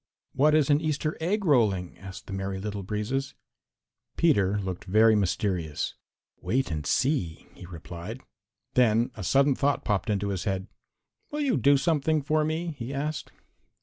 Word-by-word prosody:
"What 150 +3 +4
is 150 -2 +3
an 145 +1 +4
Easter 155 0 -1
egg 200 +5 0
rolling?" 105 - +2
asked 95 0 -9
the 100 - -7
Merry 95 0 -3
Little 100 0 -4
Breezes. 105 +7 -3 0.8
Peter 105 - +3
looked 95 -3 -4
very 110 +3 +5
mysterious. 90 -5 -1 0.5
"Wait 130 -5 0
and 75 -3 -3
see," 125 - 0
he 90 - -12
replied. 85 +7 -8 0.5
Then 115 -1 +3
a 105 - -6
sudden 135 +8 +3
thought 140 +2 0
popped 105 0 0
into 100 -1 0
his 95 -2 -3
head. 95 -1 -1 0.6
"Will 300 +1 -3
you 275 -5 +2
do 140 0 +4
something 155 +1 +1
for 155 +2 +1
me?" 160 +2 -2
he 120 +2 -5
asked. 140 +1 -3
115 Hz, 155 wpm, -27 LUFS, 95-145 Hz, 0.8 s, very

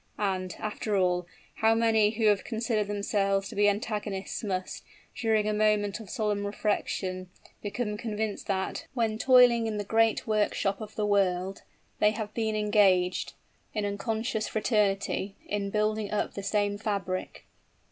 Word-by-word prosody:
And, 185 -3 -1
after 210 -1 -2
all, 180 -1 +1 0.3
how 225 0 +4
many 225 -2 +4
who 225 0 0
have 205 -2 +4
considered 225 -2 -1
themselves 200 -1 0
to - - -9
be 205 0 +4
antagonists 205 -1 -3
must, 185 -3 -3 0.3
during 220 -2 +1
a 215 - +1
moment 210 -1 +2
of 215 -4 -10
solemn 210 -1 -1
reflection, 190 -3 -2 0.3
become 210 +1 -3
convinced 215 -2 -3
that, 190 -1 -2
when 225 -3 0
toiling 245 -3 +6
in 215 -1 -2
the 205 - -2
great 225 +2 +2
workshop 210 -1 0
of 215 0 -8
the 210 - 0
world, 190 -2 +1 0.4
they 210 - +5
have 215 -1 -4
been 220 -2 -1
engaged, 200 -4 +2 0.4
in 210 -1 0
unconscious 220 +2 -2
fraternity, 205 -2 0
in 205 -1 -2
building 215 0 0
up 210 - -1
the 200 - -5
same 205 0 0
fabric! 200 -4 -3
210 Hz, 145 wpm, -28 LUFS, 200-220 Hz, 0.4 s, toiling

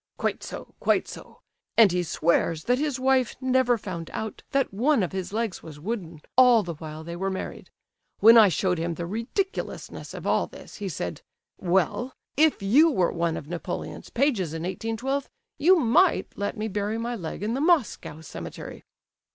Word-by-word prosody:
"Quite - - -1
so, - - -8
quite - - +2
so; - - -11 0.4
and 220 -5 +7
he 180 0 +1
swears 165 -1 +1
that 245 +2 +2
his 290 -3 -1
wife 260 -2 +2
never 260 -2 +2
found 175 -6 -6
out 220 -1 -5
that 275 -6 0
one 245 +2 +2
of 180 - -2
his 190 -1 -4
legs 220 -2 -2
was 155 -2 -11
wooden 175 -4 -5
all 245 -4 +7
the 170 - -4
while 155 0 -8
they 170 +1 -6
were 190 +2 -2
married. 190 - -6 0.5
When 225 +2 +8
I 220 -3 +8
showed 180 -1 0
him 170 0 -2
the 170 - -4
ridiculousness 230 - -4
of - - -8
all - - +2
this, - - -12
he 205 -2 -4
said, 90 - -4 0.4
'Well, 190 - 0 0.2
if 310 -7 +3
you 280 +12 +6
were 185 - +2
one 170 -1 -1
of 145 - -8
Napoleon's 175 +1 -5
pages 230 - 0
in 160 - -4
1812, 225 +9 -2 0.3
you 360 +6 +6
might 325 +5 +3
let 205 +3 -3
me 215 +1 -2
bury 205 +1 -2
my 235 +1 -3
leg 180 -1 -6
in 220 +2 -1
the 265 - -1
Moscow 300 - +1
cemetery. 160 - -8
210 Hz, 180 wpm, -26 LUFS, 175-255 Hz, 0.5 s, When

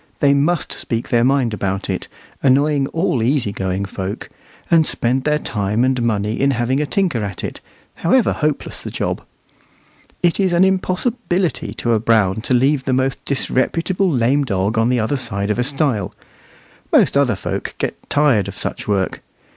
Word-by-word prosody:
They 140 -1 +4
must 150 +5 +1
speak 115 -1 -4
their 120 -1 +3
mind 130 -3 +2
about 95 -1 -2
it, 95 - -3 0.3
annoying 140 +1 +3
all 160 -6 0
easy 120 -2 +1
going 95 0 -2
folk, 95 0 -5 0.4
and 165 -2 +5
spend 130 +3 0
their 150 0 +2
time 105 -4 -1
and 130 -1 +1
money 105 -2 -1
in 140 - +3
having 125 +4 +1
a 150 - -1
tinker 175 - 0
at 100 -3 -5
it, - - -5 0.4
however 225 +7 +3
hopeless 150 -2 -2
the - - -6
job. - - -3 1.0
It 175 +2 +2
is 190 -3 +2
an 170 +2 +4
impossibility 190 0 0
to 120 - 0
a 110 - +2
Brown 110 -2 +2
to 125 - +1
leave 135 +2 +2
the 130 - 0
most 130 0 0
disreputable 165 +8 0
lame 135 0 +2
dog 100 -3 -1
on 115 +1 +2
the 125 -1 +2
other 115 +6 0
side 105 -5 -2
of 105 - -1
a - - +3
stile. 135 - 0 0.8
Most - - +4
other - - +3
folk - - -4
get - - -2
tired 140 -9 +3
of - - -8
such - - -5
work. 100 -2 -1
130 Hz, 175 wpm, -19 LUFS, 110-150 Hz, 1.0 s, and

